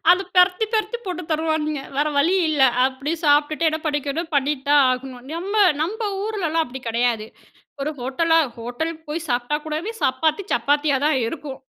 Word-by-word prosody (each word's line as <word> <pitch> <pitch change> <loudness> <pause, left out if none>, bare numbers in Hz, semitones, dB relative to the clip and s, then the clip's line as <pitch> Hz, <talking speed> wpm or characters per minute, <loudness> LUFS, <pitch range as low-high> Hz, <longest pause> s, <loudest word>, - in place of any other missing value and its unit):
அத 360 - +6 0.2
பெரத்தி 360 +4 +4
பெரத்தி 435 +2 0
போட்டு 360 -1 -4
தருவானுங்க. 310 -2 -1 0.2
வேற 295 +1 +2
வழி 325 +6 +3
இல்ல 300 -3 0 0.2
அப்டி 270 +4 -2
சாப்பிட்டுட்டு 300 +2 +3
என்ன 315 0 -1
படிக்கணும் 295 +3 -2
பண்ணி 285 +1 +2
தான் 290 0 +6
ஆகணும். 255 -1 -5
நம்ம 395 +5 +1 0.2
நம்ப 410 +8 -3 0.2
ஊருலலாம் 340 -7 -1
அப்டி 260 0 -9
கடையாது. 230 -1 0 0.6
ஒரு 300 - -1
ஹோட்டலா 325 +6 +2 0.2
ஹோட்டல் 245 +8 -3 0.2
போய் 325 +2 -4
சாப்பிட்டா 245 +3 0
கூடவே 315 +8 -3
சப்பாத்தி 315 +7 +1
சப்பாத்தியா 290 +4 +2
தான் 300 -3 +2
இருக்கும். 275 0 -6
305 Hz, 155 wpm, -22 LUFS, 270-330 Hz, 0.6 s, அத